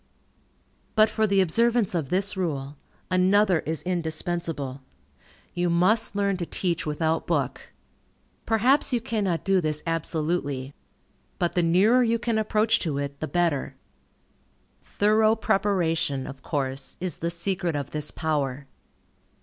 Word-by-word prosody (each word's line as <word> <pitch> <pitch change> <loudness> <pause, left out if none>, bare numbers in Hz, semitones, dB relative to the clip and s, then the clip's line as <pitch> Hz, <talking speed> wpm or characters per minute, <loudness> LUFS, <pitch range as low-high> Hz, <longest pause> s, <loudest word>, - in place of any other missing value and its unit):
But 215 -1 +5
for 220 0 +1
the 195 -1 +3
observance 230 +4 +2
of 160 -6 -2
this 195 +3 0
rule, 145 -6 -3 0.4
another 185 0 +4
is 160 -1 -2
indispensable. 165 -5 -3 0.7
You 175 0 0
must 185 +6 +2
learn 200 -1 +1
to 175 - -3
teach 170 -4 -2
without 160 +2 -1
book. - - -2 0.8
Perhaps 245 +7 +3
you 245 - +2
cannot 205 -7 -1
do 195 -1 +2
this 155 -2 -1
absolutely. 155 -4 -2 0.6
But 175 - 0
the 175 - +2
nearer 190 +9 +4
you 230 0 +2
can 230 -1 -1
approach 220 +1 +2
to 155 -5 -2
it, 140 0 -4
the 155 - -3
better. 170 -6 0 1.1
Thorough 215 +1 +2
preparation, 170 -10 0
of 135 -1 -9
course, 135 -2 -3
is 180 -1 -3
the 170 - -2
secret 175 -1 -2
of 140 -3 -4
this 150 -1 -2
power. 145 -4 -2
175 Hz, 135 wpm, -25 LUFS, 155-205 Hz, 1.1 s, But